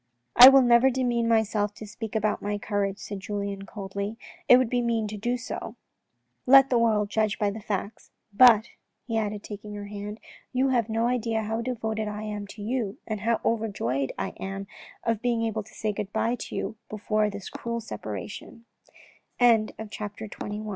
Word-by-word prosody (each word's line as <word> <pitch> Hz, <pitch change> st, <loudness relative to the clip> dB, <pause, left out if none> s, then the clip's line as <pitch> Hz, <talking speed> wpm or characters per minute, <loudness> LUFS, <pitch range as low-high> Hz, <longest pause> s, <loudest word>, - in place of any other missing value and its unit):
" -, -, -51 dB
I 250 Hz, +2 st, +12 dB
will 270 Hz, -1 st, +6 dB
never 240 Hz, +2 st, +5 dB
demean 240 Hz, -2 st, 0 dB
myself 215 Hz, -2 st, +1 dB
to 215 Hz, -, -9 dB
speak 220 Hz, +1 st, -7 dB
about 215 Hz, -1 st, 0 dB
my 205 Hz, 0 st, -2 dB
courage," 200 Hz, -1 st, -2 dB
said 205 Hz, -1 st, -7 dB
Julien, 200 Hz, 0 st, -4 dB
coldly, 200 Hz, +1 st, -5 dB, 0.2 s
" -, -, -26 dB
it 250 Hz, -, +10 dB
would 255 Hz, -1 st, +2 dB
be 245 Hz, +1 st, 0 dB
mean 230 Hz, -2 st, 0 dB
to 215 Hz, -, -5 dB
do 240 Hz, +4 st, -1 dB
so. 250 Hz, -, -6 dB, 0.7 s
Let 270 Hz, +1 st, +7 dB
the 245 Hz, -, +4 dB
world 215 Hz, -3 st, +2 dB
judge 215 Hz, -1 st, +1 dB
by 205 Hz, -2 st, +1 dB
the 215 Hz, -, -7 dB
facts. 205 Hz, 0 st, -5 dB, 0.2 s
But," 230 Hz, 0 st, +7 dB, 0.4 s
he 225 Hz, -2 st, 0 dB
added, 210 Hz, -1 st, -3 dB
taking 210 Hz, 0 st, -8 dB
her 205 Hz, 0 st, -6 dB
hand, 205 Hz, +1 st, -7 dB, 0.2 s
" -, -, -31 dB
you 260 Hz, +1 st, +2 dB
have 240 Hz, -4 st, +1 dB
no 225 Hz, +1 st, 0 dB
idea 230 Hz, -2 st, 0 dB
how 225 Hz, +2 st, -2 dB
devoted 220 Hz, -3 st, -3 dB
I 210 Hz, 0 st, -5 dB
am 210 Hz, -1 st, -5 dB
to 205 Hz, +1 st, -9 dB
you 220 Hz, -3 st, -2 dB
and 215 Hz, -2 st, -3 dB
how 230 Hz, +1 st, +1 dB
over 225 Hz, -1 st, +1 dB
joyed 135 Hz, -, -2 dB
I -, -, -2 dB
am 195 Hz, +1 st, -5 dB, 0.4 s
of 225 Hz, -2 st, 0 dB
being 235 Hz, -2 st, 0 dB
able 220 Hz, -1 st, -2 dB
to 210 Hz, -, -16 dB
say 215 Hz, -1 st, -2 dB
good 200 Hz, 0 st, -5 dB
bye 230 Hz, -, 0 dB
to 245 Hz, -, -6 dB
you 220 Hz, -, -3 dB
before 215 Hz, 0 st, 0 dB
this 200 Hz, -2 st, -8 dB
215 Hz, 180 wpm, -26 LUFS, 205-235 Hz, 0.7 s, I